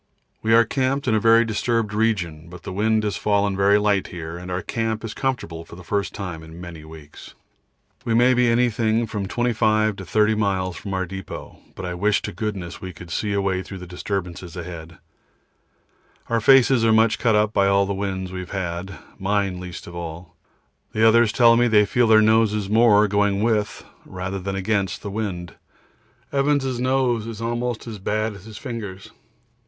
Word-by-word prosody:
We 110 +1 +3
are 115 0 +6
camped 130 +3 -1
in 115 - +3
a 110 - +3
very 115 +2 +5
disturbed 115 0 -1
region, 90 -8 -1
but 90 0 -11
the - - -6
wind 110 +2 +1
has 105 -1 -1
fallen 100 -1 +1
very 100 +1 +4
light 105 -2 +1
here, 85 -1 -7
and 90 +1 -8
our 90 0 -3
camp 115 -1 -2
is 110 - -5
comfortable 120 -12 -3
for 80 - -13
the 90 - -12
first 100 +1 -1
time 90 -5 -6
for 80 - -12
many 85 -1 -10
weeks. 80 -2 -13 0.7
We 115 -3 0
may 125 +2 +5
be 125 -1 +3
anything 115 -1 +2
from 105 -3 -4
25 110 -2 +1
to 95 - -7
30 105 +3 +2
miles 95 -4 -1
from 95 +3 -5
our 95 0 -1
depot, 95 +1 -8 0.2
but 95 - -6
I 90 - -3
wish 105 +4 +1
to 105 - -4
goodness 95 -2 -5
we 95 -1 -7
could 85 0 -11
see 105 +4 -1
a 100 - +1
way 95 -1 0
through 95 +1 -9
the 90 - -9
disturbances 90 -1 -5
ahead. 85 -2 -8 1.3
Our 115 -1 +1
faces 130 0 +5
are 115 - +4
much 110 0 +3
cut 115 -3 +2
up 105 0 +2
by 100 -1 +3
all 100 0 +3
the 100 - -2
winds 95 -2 -3
we 95 - -5
have 90 - -7
had, 90 -1 -4 0.2
mine 95 -1 0
least 90 -1 -8
of 85 - -10
all; 85 0 -7 0.6
the 110 +1 +4
others 115 -1 +5
tell 115 -1 +5
me 120 +1 +3
they 105 -2 +5
feel 120 +3 +2
their 110 -1 +6
noses 105 -2 +2
more 105 -2 +5
going 100 0 +1
with 110 -3 0 0.2
than 95 +1 -4
against 95 -2 -1
the 100 - -5
wind. 95 -5 -4 0.8
Evans' 140 -3 +1
nose 125 -3 +1
is 115 -2 -7
almost 120 0 -2
as 110 -3 -7
bad 110 +3 -1
as 100 0 -13
his 110 -2 -10
fingers. 110 -8 -7
105 Hz, 190 wpm, -22 LUFS, 95-115 Hz, 1.3 s, are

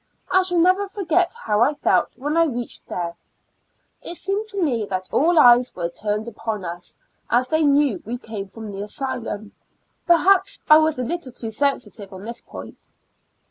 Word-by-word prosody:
I 375 - +5
shall 360 -1 0
never 370 +4 +3
forget 360 -1 0
how 210 0 +1
I 285 +5 +3
felt - - +1
when 290 +5 -2
I 330 0 +5
reached 245 -5 -5
there. 170 -1 -4 0.9
It 345 - -4
seemed 395 +5 -1
to 405 -2 -3
me 255 - +1
that 185 -1 -3
all 335 +4 +3
eyes 245 -2 +6
were 170 -1 -2
turned 210 +4 -2
upon 220 -3 -4
us, 175 +1 -6 0.3
as 250 +1 +2
they 315 0 +2
knew 285 -5 +3
we 235 +3 -4
came 220 -5 -7
from 220 +1 -9
the 195 0 -6
asylum; 215 -2 -4 0.6
perhaps 380 +3 +4
I 305 0 +8
was 315 -2 +1
a 250 - -2
little 305 0 -4
too 230 -2 -5
sensitive 220 -5 -1
on 190 +1 -9
this 235 +1 -4
point. - - -11
250 Hz, 180 wpm, -22 LUFS, 210-335 Hz, 0.9 s, I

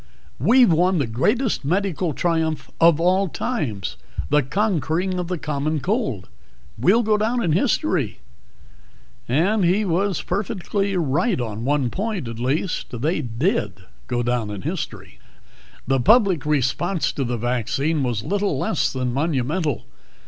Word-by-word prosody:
We've 230 - +5
won 180 +3 +3
the 140 - +1
greatest 210 - 0
medical 180 +1 0
triumph 160 0 -1
of 165 -2 +6
all 185 +3 +3
times 110 - -3 0.3
the 150 0 +5
conquering 180 - 0
of 175 - -3
the 180 0 -2
Common 150 0 -2
Cold. 160 - -2 0.5
We'll 190 - +3
go 215 -1 +2
down 235 +3 0
in 170 - +1
history!" 180 - +1 1.1
And 185 - +2
he 190 +5 +2
was 190 +1 0
perfectly 200 0 -2
right 170 - +1
on 115 -1 -4
one 140 -3 +1
point, 200 - -3
at 115 0 -6
least. 130 -1 -2
They 155 +3 0
did 120 - -1 0.3
go 120 0 -1
down 120 -3 -1
in 100 -3 -6
history. - - -5 0.7
The 135 +1 +1
public 185 - +4
response 150 +5 0
to 140 - -2
the 120 -1 -2
vaccine 125 +6 0
was 120 -5 -1
little 200 - 0
less - - 0
than 125 -2 -2
monumental. 150 - -1
160 Hz, 140 wpm, -22 LUFS, 130-195 Hz, 1.1 s, of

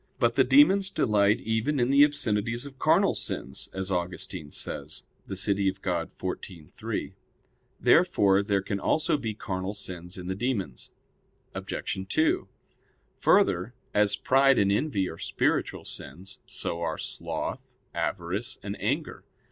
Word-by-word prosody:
But - - +3
the - - +5
demons 200 -9 +5
delight 105 - +3
even 115 +6 0
in 120 +2 +2
the 140 +1 +7
obscenities 120 -5 0
of 135 -2 -11
carnal - - +4
sins; 65 - -5
as 95 0 -3
Augustine 90 -2 -3
says - - -5 0.2
(De 95 - -4
Civ. 100 +1 +2
Dei 100 -1 +2
xiv, 90 -2 -5
3). - - -4 0.7
Therefore 100 -1 +4
there 100 -1 0
can 100 0 -2
also 160 - +2
be 115 -7 -3
carnal 95 0 -4
sins 90 -2 -7
in 90 - -7
the 95 - -2
demons. 100 - -3 0.6
Obj. - - -4
2: 155 -9 +2 0.7
Further, 90 +8 +3 0.2
as 105 -1 +4
pride 135 0 +4
and 100 -1 +3
envy 105 -4 +1
are 80 - -8
spiritual - - -1
sins, 90 +8 -8
so 85 - -4
are 80 -2 -2
sloth, - - -5 0.2
avarice, 95 +5 -2
and 100 0 -4
anger. 140 - -2
100 Hz, 140 wpm, -27 LUFS, 95-125 Hz, 0.7 s, the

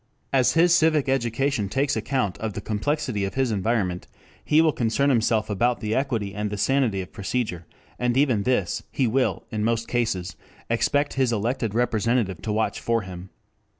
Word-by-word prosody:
As 130 -2 +4
his 170 +1 +5
civic 160 -4 +3
education 130 -3 0
takes 135 +5 0
account 110 -3 -1
of 110 -2 -3
the - - -4
complexity 110 +1 -2
of 95 0 -3
his 130 -3 +1
environment, 100 -3 -1 0.4
he 150 - +3
will 160 -1 +5
concern 140 +3 +1
himself 115 -3 +2
about 120 +4 +1
the 110 0 -2
equity 115 -7 -1
and 105 0 -2
the 105 - -4
sanity 110 -2 +1
of 90 - -9
procedure, 100 -5 -3 0.3
and 125 0 +1
even 130 -7 +3
this 100 -6 0
he 135 - 0
will 125 +3 0
in 110 -2 -2
most 115 0 0
cases 95 -9 -1 0.4
expect 145 +5 +1
his 130 -3 +1
elected 115 0 -1
representative 115 -5 0
to 110 - -3
watch 110 +1 0
for 115 -2 0
him. 90 0 -9
115 Hz, 175 wpm, -24 LUFS, 105-135 Hz, 0.4 s, his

